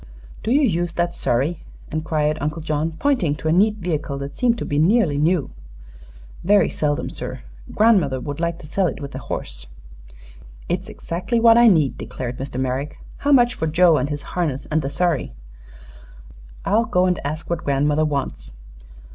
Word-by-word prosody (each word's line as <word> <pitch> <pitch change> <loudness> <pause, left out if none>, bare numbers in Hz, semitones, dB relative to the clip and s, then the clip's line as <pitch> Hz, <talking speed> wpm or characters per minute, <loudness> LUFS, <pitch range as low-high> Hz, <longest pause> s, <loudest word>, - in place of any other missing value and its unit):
"Do - - -3
you 285 +4 +4
use 175 - 0
that 175 0 -1
surrey?" 140 +8 -1 0.3
inquired 155 -1 -1
Uncle 150 +2 -3
John, 155 +1 -1
pointing 245 - +1
to 160 - -5
a - - +3
neat 210 +5 +4
vehicle 155 -7 -3
that 140 +1 -6
seemed 240 -2 +2
to - - -4
be 145 - -1
nearly 170 -4 +3
new. 160 0 +1 0.9
"Very 200 -1 +4
seldom, 145 -1 -1
sir. - - -6 0.3
Grandmother 190 - +3
would 145 +2 -6
like 170 0 -1
to - - -11
sell 185 +5 0
it - - -4
with 140 -1 -7
the 130 - -6
horse." - - -6 1.0
"It's - - -2
exactly 185 +8 -2
what 230 0 +7
I 235 0 +7
need," 160 - +3
declared 125 -1 -6
Mr. 130 -1 -5
Merrick. 130 +3 -2 0.2
"How 290 - 0
much 245 -3 +5
for 160 - -2
Joe 165 +1 +4
and 140 +2 -1
his 145 -1 -4
harness, 155 -7 -1
and 155 +1 +2
the 135 - -3
surrey?" 160 - -1 1.3
"I'll 225 +3 +2
go 185 -4 +2
and 180 -2 +1
ask 155 +3 -4
what 170 0 -3
grandmother 145 +2 +1
wants." 130 - -3
155 Hz, 175 wpm, -21 LUFS, 145-180 Hz, 1.3 s, what